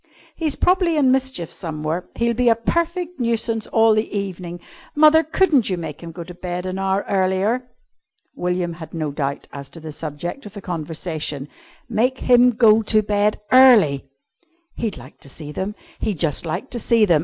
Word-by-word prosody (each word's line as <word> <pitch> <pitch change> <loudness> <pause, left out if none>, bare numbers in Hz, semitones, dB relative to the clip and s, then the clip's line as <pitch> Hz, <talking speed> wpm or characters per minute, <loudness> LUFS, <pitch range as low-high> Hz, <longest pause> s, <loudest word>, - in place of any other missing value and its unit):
"He's 315 -4 -1
probably 360 -3 +2
in 270 -3 +4
mischief 260 -10 -1
somewhere. 160 +1 -4
He'll 235 0 +1
be 245 +1 +3
a 230 - +5
perfect 340 +8 -2
nuisance 230 -2 -1
all 225 0 +4
the 215 +1 0
evening. 180 -3 -5 0.4
Mother, 310 +1 +6
couldn't 315 - +2
you 185 - -1
make 160 -3 -6
him 170 -1 -8
go 170 +1 -7
to 180 +1 -10
bed 180 0 -5
an 185 +1 -3
hour 195 +1 0
earlier?" 200 +6 0 0.7
William 180 -1 -1
had 160 -1 -10
no 155 -3 -2
doubt 140 -1 -3
as 140 -1 -8
to 165 - -11
the 155 -1 -8
subject 160 - -6
of 205 - -12
the - - -6
conversation. 155 -4 -4 0.4
Make 245 +3 +1
him 245 0 +6
go 225 -2 +5
to 215 0 +2
bed 210 0 +1
early! 210 - +6 0.6
He'd 225 -4 -3
like 130 +3 -13
to 140 - -12
see 150 +2 -9
them! 190 +7 -4 0.2
He'd 210 -5 -2
just 160 +1 -1
like 165 +11 -4
to 240 - -3
see 230 -1 +3
them! 170 -6 +4
200 Hz, 180 wpm, -21 LUFS, 165-240 Hz, 0.7 s, Mother